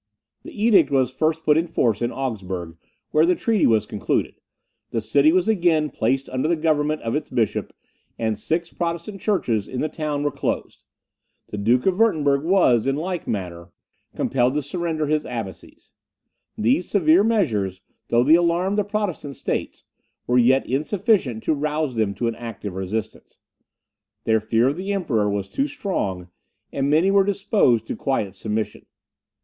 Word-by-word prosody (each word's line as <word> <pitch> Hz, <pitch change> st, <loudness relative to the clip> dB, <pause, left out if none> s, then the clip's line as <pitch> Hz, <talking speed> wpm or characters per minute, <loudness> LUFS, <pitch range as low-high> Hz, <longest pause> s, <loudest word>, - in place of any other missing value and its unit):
The -, -, -11 dB
edict 225 Hz, -3 st, +5 dB
was 130 Hz, -3 st, +2 dB
first 155 Hz, +4 st, 0 dB
put 150 Hz, 0 st, +4 dB
in 165 Hz, +2 st, +1 dB
force 120 Hz, -10 st, 0 dB
in 120 Hz, 0 st, 0 dB
Augsburg, 95 Hz, -10 st, -4 dB, 0.4 s
where 155 Hz, -, +4 dB
the 180 Hz, +2 st, +3 dB
treaty 220 Hz, +3 st, +2 dB
was 110 Hz, -2 st, +3 dB
concluded; 105 Hz, -, -1 dB, 0.6 s
the 115 Hz, -, -1 dB
city 140 Hz, +7 st, +3 dB
was 185 Hz, +3 st, +2 dB
again 170 Hz, -8 st, +2 dB
placed 130 Hz, +4 st, 0 dB
under 130 Hz, +3 st, -1 dB
the 170 Hz, -, +2 dB
government 155 Hz, -1 st, 0 dB
of 115 Hz, +2 st, -2 dB
its 150 Hz, -, -3 dB
bishop, 120 Hz, -4 st, -1 dB, 0.5 s
and 110 Hz, -1 st, -1 dB
six 170 Hz, +7 st, -3 dB
Protestant 170 Hz, +3 st, -4 dB
churches 120 Hz, -, 0 dB
in 125 Hz, -, -5 dB
the 155 Hz, -, 0 dB
town 150 Hz, -2 st, -3 dB
were 145 Hz, -, 0 dB
closed. -, -, -3 dB, 0.7 s
The 105 Hz, -, -5 dB
Duke 120 Hz, +5 st, +2 dB
of 190 Hz, +1 st, +1 dB
Wirtemberg 145 Hz, -11 st, +3 dB
was, 160 Hz, -, +3 dB
in 135 Hz, -, +1 dB
like 175 Hz, +2 st, -4 dB
manner, 90 Hz, -4 st, -4 dB, 0.5 s
compelled 130 Hz, 0 st, +1 dB
to 150 Hz, -, 0 dB
surrender 160 Hz, +1 st, -2 dB
his 150 Hz, +1 st, 0 dB
abbacies. 115 Hz, -7 st, -8 dB, 0.7 s
These 125 Hz, +11 st, +1 dB
severe 175 Hz, -1 st, +4 dB
measures, 110 Hz, -, 0 dB, 0.3 s
though 120 Hz, +1 st, +3 dB
they 150 Hz, +5 st, +5 dB
alarmed 175 Hz, +4 st, +2 dB
the -, -, +2 dB
Protestant 200 Hz, -9 st, -3 dB
states, -, -, -4 dB, 0.4 s
were 125 Hz, +1 st, +3 dB
yet 130 Hz, +3 st, +4 dB
insufficient 150 Hz, -, 0 dB
to -, -, +1 dB
rouse 150 Hz, -1 st, -1 dB
them 110 Hz, -3 st, -1 dB
to 120 Hz, -, -1 dB
an 115 Hz, -, -1 dB
active 110 Hz, -4 st, -7 dB
resistance. 105 Hz, +4 st, -5 dB, 0.9 s
Their 110 Hz, 0 st, +2 dB
fear 115 Hz, +3 st, +1 dB
of 145 Hz, -, -3 dB
the 195 Hz, +2 st, -3 dB
Emperor 115 Hz, -, 0 dB
was 100 Hz, -1 st, -2 dB
too 275 Hz, -, -1 dB
strong, 100 Hz, -, -3 dB, 0.4 s
and 140 Hz, 0 st, 0 dB
many 165 Hz, +6 st, +3 dB
were 200 Hz, 0 st, +5 dB
disposed 195 Hz, -, +2 dB
to -, -, -4 dB
quiet 110 Hz, -8 st, -1 dB
submission. 105 Hz, +2 st, -4 dB
145 Hz, 165 wpm, -22 LUFS, 115-170 Hz, 0.9 s, edict